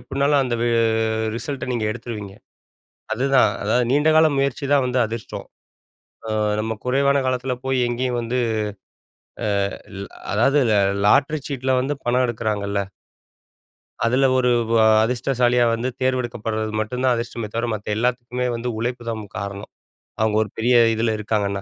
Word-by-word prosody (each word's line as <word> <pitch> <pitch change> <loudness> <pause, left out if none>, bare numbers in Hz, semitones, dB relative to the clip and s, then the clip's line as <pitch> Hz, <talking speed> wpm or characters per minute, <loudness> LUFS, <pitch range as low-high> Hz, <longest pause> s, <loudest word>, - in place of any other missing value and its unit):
எப்படினாலும், 140 +1 +1
அந்த 125 -2 -1
வெ 120 - +2 0.7
ரிசல்ட்ட 140 +1 -5
நீங்க 115 -3 -1
எடுத்துருவீங்க. 110 -3 -6 0.8
அதுதான். 130 -2 +3
அதாவது 120 +3 +1
நீண்டகால 155 +2 +5
முயற்சிதான் 140 +1 +1
வந்து 125 0 0
அதிர்ஷ்டம். 115 0 -7 0.8
அ, - - -3 0.3
நம்ம 110 +1 -2
குறைவான 140 +2 +2
காலத்துல 130 0 -1
போய் 130 -1 0
எங்கயும் 120 0 -1
வந்து, 120 +2 -2 1.3
அ, - - -6 0.3
ல் 100 - -7 0.3
அதாவது 135 +7 +3
லா 100 - +4 0.3
லாட்டரி 150 +7 +3
சீட்ல 130 -1 -1
வந்து 145 +3 -2
பணம் 125 +1 +2
எடுக்கிறாங்கள்ல 105 -4 -2 1.3
அதுல, 130 +4 +3
ஒரு 125 -1 +2 0.2
வா 115 -1 +4 0.2
அதிர்ஷ்டசாலியா 125 0 +1
வந்து 115 +3 -1
தேர்ந்தெடுக்கப்படுறது 115 -4 -1
மட்டும் 125 +4 -3
தான் 130 - +4
அதிர்ஷ்டமே 115 -1 -4
தவிர, 115 +1 -1
மத்த 105 -1 -6
எல்லாத்துக்குமே 125 +1 -1
வந்து 120 +1 -3
உழைப்பு 120 +1 -3
தான் 115 -1 -3
முக் 105 - -13
காரணம், 100 0 -6 0.5
அவங்க 110 -1 +1
ஒரு 105 - -9
பெரிய 120 +2 +2 0.2
இதுல 110 0 0
இருக்காங்கன்னா. 100 -2 -1
120 Hz, 140 wpm, -22 LUFS, 110-130 Hz, 1.3 s, நீண்டகால